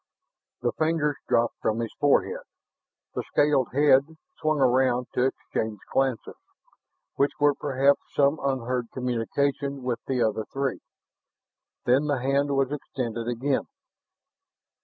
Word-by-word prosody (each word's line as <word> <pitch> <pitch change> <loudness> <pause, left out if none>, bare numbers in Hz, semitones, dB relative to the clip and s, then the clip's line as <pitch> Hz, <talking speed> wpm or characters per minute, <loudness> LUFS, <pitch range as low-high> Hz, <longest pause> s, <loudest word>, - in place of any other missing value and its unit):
The 120 - +2
fingers 155 -2 +1
dropped 115 0 +1
from 110 - 0
his 115 -2 -3
forehead; 455 - +2 0.7
the - - -2
scaled 145 -4 +2
head 145 +3 +3 0.2
swung 155 -1 +1
around 125 -1 +3
to 125 - +2
exchange 110 -4 -3 0.2
glances, 135 -3 0 0.8
which 140 +1 +2
were 145 0 +4
perhaps 140 0 +2
some 140 +2 +3
unheard 125 -3 -1
communication 135 +3 -1
with 125 -2 -1
the 130 -2 +1
other 110 0 0
three. 135 -1 -2 1.1
Then 130 +4 +3
the 145 -2 +1
hand 140 +2 +1
was 135 0 +1
extended 120 -5 -4
again. 130 +3 -1
135 Hz, 120 wpm, -26 LUFS, 125-145 Hz, 1.1 s, were